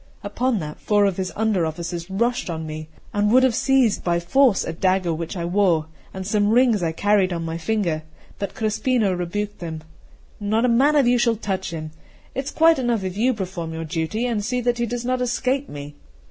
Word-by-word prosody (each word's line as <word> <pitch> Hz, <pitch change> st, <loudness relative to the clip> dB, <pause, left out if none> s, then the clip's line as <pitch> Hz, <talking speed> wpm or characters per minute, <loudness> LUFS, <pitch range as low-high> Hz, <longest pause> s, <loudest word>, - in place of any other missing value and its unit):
Upon 235 Hz, +4 st, 0 dB
that 150 Hz, -4 st, -6 dB
four 205 Hz, -1 st, +3 dB
of 195 Hz, -3 st, 0 dB
his 185 Hz, -1 st, -2 dB
under 215 Hz, -5 st, +1 dB
officers 170 Hz, +2 st, -4 dB
rushed 235 Hz, +3 st, 0 dB
on 160 Hz, -1 st, -4 dB
me, 155 Hz, 0 st, -7 dB, 0.2 s
and 205 Hz, 0 st, +2 dB
would 255 Hz, +2 st, +6 dB
have 260 Hz, -2 st, +4 dB
seized 260 Hz, -3 st, +2 dB
by 170 Hz, -1 st, +1 dB
force 220 Hz, +5 st, +3 dB
a 165 Hz, -, -3 dB
dagger 185 Hz, 0 st, +1 dB
which 165 Hz, +3 st, -5 dB
I 170 Hz, -, -2 dB
wore, 175 Hz, -3 st, +2 dB, 0.3 s
and 190 Hz, 0 st, -6 dB
some 205 Hz, +1 st, +2 dB
rings 235 Hz, -3 st, +4 dB
I 165 Hz, -2 st, 0 dB
carried 200 Hz, +2 st, +2 dB
on 170 Hz, -1 st, -3 dB
my 165 Hz, 0 st, -4 dB
finger; 175 Hz, -4 st, -1 dB, 0.4 s
but 200 Hz, -, -4 dB
Crespino 220 Hz, -1 st, +1 dB
rebuked 200 Hz, +4 st, -3 dB
them: 160 Hz, -2 st, -6 dB, 0.6 s
"Not 215 Hz, +3 st, +1 dB
a -, -, +3 dB
man 270 Hz, +6 st, +4 dB
of 285 Hz, -3 st, +5 dB
you 245 Hz, 0 st, +3 dB
shall 235 Hz, -1 st, +3 dB
touch 200 Hz, -3 st, -3 dB
him: 155 Hz, -2 st, -6 dB, 0.4 s
it 270 Hz, -, -3 dB
is -, -, -3 dB
quite 325 Hz, -2 st, +4 dB
enough 240 Hz, -5 st, 0 dB
if 185 Hz, -1 st, -4 dB
you 240 Hz, +5 st, +2 dB
perform 180 Hz, -5 st, -5 dB
your 165 Hz, 0 st, -4 dB
duty, 165 Hz, +8 st, -2 dB
and 230 Hz, -4 st, -1 dB
see 250 Hz, +3 st, -1 dB
that 245 Hz, 0 st, 0 dB
he 235 Hz, -, 0 dB
does 240 Hz, +1 st, -4 dB
not 255 Hz, 0 st, 0 dB
escape 255 Hz, +3 st, 0 dB
me." 145 Hz, 0 st, -8 dB
205 Hz, 215 wpm, -22 LUFS, 170-240 Hz, 0.6 s, would